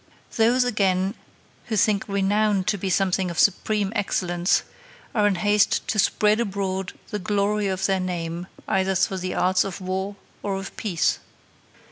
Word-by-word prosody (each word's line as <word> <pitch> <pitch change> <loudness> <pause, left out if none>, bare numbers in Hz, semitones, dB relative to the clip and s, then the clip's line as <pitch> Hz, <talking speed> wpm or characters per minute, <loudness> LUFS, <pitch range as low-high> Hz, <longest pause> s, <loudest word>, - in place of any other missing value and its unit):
Those, 235 +3 +4
again, 195 -5 +1 0.5
who 220 -3 -2
think 205 -1 +2
renown 200 0 +1
to 205 +2 0
be 190 - -2
something 190 0 +1
of 170 - -6
supreme 205 +2 +2
excellence 175 -3 +1 0.5
are 210 -2 +3
in 200 - +2
haste 205 +2 +2
to 215 - 0
spread 210 +2 +3
abroad 195 -3 -2 0.2
the 210 - -2
glory 205 +2 0
of 190 0 -1
their 195 -1 +2
name 175 -1 -3 0.2
either 190 0 +1
through 190 +1 +1
the 185 0 -3
arts 185 0 +3
of 195 -1 -5
war 190 +2 -3 0.3
or 200 -1 -2
of 195 0 -6
peace. 185 -7 0
195 Hz, 155 wpm, -24 LUFS, 185-210 Hz, 0.5 s, Those